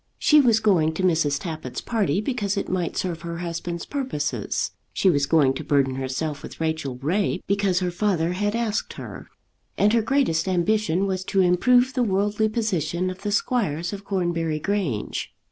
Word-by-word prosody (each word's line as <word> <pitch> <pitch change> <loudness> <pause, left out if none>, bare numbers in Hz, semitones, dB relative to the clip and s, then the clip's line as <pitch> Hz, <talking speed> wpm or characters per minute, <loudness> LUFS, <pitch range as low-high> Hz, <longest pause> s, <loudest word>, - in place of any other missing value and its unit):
She 300 -1 +5
was 230 -4 +4
going 170 -8 +2
to 190 - -2
Mrs. 160 -5 +2
Tappitt's 155 -7 -5
party 200 -6 0
because 210 -4 -2
it - - -2
might 180 -2 -2
serve 175 -3 -2
her 170 0 -5
husband's 170 0 -4
purposes; 150 - -2 0.2
she 190 - +3
was 145 -3 +1
going 145 -4 +4
to 155 - -5
burden 140 -2 +2
herself 135 +3 -3
with - - -10
Rachel 160 -5 -2
Ray 180 +8 0
because 195 -2 +1
her 180 -1 0
father 175 -3 0
had 205 +3 -1
asked 230 -2 -1
her; - - -9 0.5
and 210 +2 +3
her 230 - +4
greatest 220 - +1
ambition 190 0 +1
was 190 -1 -2
to 195 0 +2
improve 245 +9 +4
the 255 - 0
worldly 210 0 +1
position 185 -5 -1
of 185 - -10
the 205 - -2
squires 195 - 0
of 200 0 -7
Cornbury 175 -5 -1
Grange. 170 - -2
180 Hz, 175 wpm, -24 LUFS, 160-210 Hz, 0.5 s, She